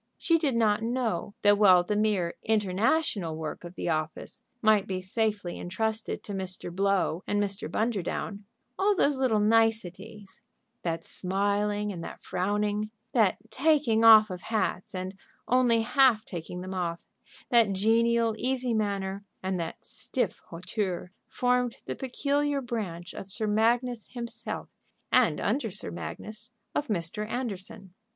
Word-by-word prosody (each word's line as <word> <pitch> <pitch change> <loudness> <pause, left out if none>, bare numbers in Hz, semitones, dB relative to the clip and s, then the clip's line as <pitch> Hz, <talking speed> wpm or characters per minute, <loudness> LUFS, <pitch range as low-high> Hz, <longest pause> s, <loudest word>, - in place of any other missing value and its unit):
She 330 -2 +3
did 285 -6 +1
not 215 -2 +3
know 225 -5 -1
that 205 0 +5
while 185 -4 +7
the 210 +4 -1
mere 205 -5 +1
international 210 - +1
work 155 +1 -5
of 175 +1 -9
the - - -3
office 155 -1 -2 0.2
might 215 -3 +4
be 185 -1 -2
safely 205 -1 -2
intrusted 220 +5 -2
to 205 - -6
Mr. 185 -2 -5
Blow 195 -3 +1
and 205 - +1
Mr. 200 0 -2
Bunderdown, 205 -2 -2 0.3
all 405 +1 +3
those 285 -6 +2
little 255 -5 +2
niceties, 215 -2 0 0.4
that 165 -1 -2
smiling 205 +2 0
and 170 -4 -6
that - - -9
frowning, 205 +3 -1 0.2
that 220 -6 +3
taking 275 -7 +3
off 215 -2 +9
of 180 -1 -6
hats 210 -4 -2
and 185 +1 -4 0.3
only 245 -2 +4
half 250 -3 +4
taking 180 0 -6
them 185 +1 -6
off, 170 -2 -3 0.5
that 230 -4 +5
genial, 230 +3 +3
easy 255 -1 0
manner, 200 -2 -1 0.2
and 185 -1 -1
that 165 - -5
stiff - - -2
hauteur, 185 +1 -3 0.2
formed 250 -1 +1
the - - -3
peculiar 280 +2 0
branch 195 -9 -4
of 195 - -8
Sir 215 - -2
Magnus 230 +2 +1
himself, 235 -2 -5 0.4
and, - - +4
under 265 -5 0
Sir 175 - -5
Magnus, 210 - -7 0.2
of 295 - -1
Mr. 210 +1 -3
Anderson. 200 -6 -5
210 Hz, 140 wpm, -28 LUFS, 185-230 Hz, 0.5 s, off